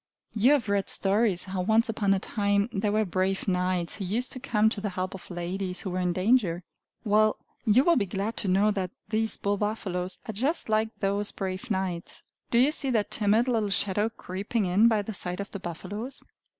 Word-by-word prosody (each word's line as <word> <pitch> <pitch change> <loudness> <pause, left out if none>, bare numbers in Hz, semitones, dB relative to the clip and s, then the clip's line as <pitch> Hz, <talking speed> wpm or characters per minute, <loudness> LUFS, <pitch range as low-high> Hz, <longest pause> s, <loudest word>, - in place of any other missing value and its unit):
You 235 +6 +4
have 275 -7 +1
read 200 -1 0
stories, 200 -2 +2
how 190 -1 -3
once 220 +4 +3
upon 215 -3 0
a - - -1
time 200 +1 0
there 205 0 0
were 215 +1 +2
brave 190 +2 -1
knights 180 -2 0
who 200 - -4
used 230 +7 -1
to 255 - -6
come 220 -5 +2
to 210 - -4
the 205 - -2
help 185 0 -4
of 190 - -10
ladies 180 +1 -3
who 190 - -4
were 185 - -2
in 180 -1 +1
danger. 185 -2 +2 0.4
Well, 215 0 +3 0.3
you 225 +5 +5
will 340 0 +4
be 200 -5 +1
glad 200 +4 -3
to 205 - -2
know 195 +3 +3
that 190 -3 -2 0.2
these 220 0 +1
bull 200 0 -1
buffaloes 190 -4 -2
are 220 - -4
just 265 - -1
like 220 +1 +2
those 200 +1 0
brave 190 +4 -5
knights. 190 -4 -3 0.3
Do 235 - +2
you 260 +5 +5
see 285 -3 +3
that 220 -5 0
timid 215 +3 +3
little 225 -4 +1
shadow 205 +2 +2
creeping 205 +1 -3
in 190 +5 +4
by 220 -3 +2
the 220 - -6
side 180 -1 -4
of 200 - -5
the 200 - -6
buffaloes? 190 +8 -6
205 Hz, 210 wpm, -27 LUFS, 185-220 Hz, 0.4 s, you